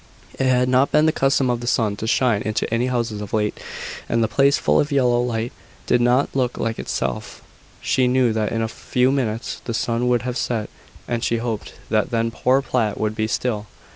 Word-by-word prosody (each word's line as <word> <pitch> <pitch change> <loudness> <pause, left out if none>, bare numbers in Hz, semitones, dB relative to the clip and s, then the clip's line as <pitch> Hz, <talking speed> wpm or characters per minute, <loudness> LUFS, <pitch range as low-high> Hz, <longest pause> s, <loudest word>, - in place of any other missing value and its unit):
It 135 - +2
had 125 -1 +3
not 130 +2 +3
been 150 +1 +4
the 160 - +4
custom 135 -3 +2
of 120 - -1
the 120 - -6
sun 110 -4 +1
to 110 - -4
shine 115 -3 +2
into 110 +2 -1
any 120 +2 +1
houses 115 -4 -2
of 105 - -8
late; 105 -1 0 0.5
and 115 0 +2
the - - +2
place 140 +5 +3
full - - +2
of 145 - 0
yellow 125 -3 +3
light, 120 -1 -2 0.3
did 120 - +2
not 125 +4 +2
look 125 -2 0
like 115 0 -2
itself. 60 - -4 0.4
She 130 -1 +2
knew 125 -2 +3
that 110 -1 -1
in 115 0 0
a - - 0
few 125 +3 0
minutes 120 -4 -2
the 115 - -2
sun 115 +1 0
would 120 -1 +2
have 125 0 -3
set; 115 -6 -2 0.4
and 120 -1 -2
she 115 - +1
hoped 115 -2 -4 0.2
that 110 -1 +2
then 115 0 0
poor 130 +4 +2
Platt 115 -6 -1
would 110 0 0
be 110 0 -1
still. 110 -2 -2
120 Hz, 215 wpm, -22 LUFS, 110-125 Hz, 0.5 s, been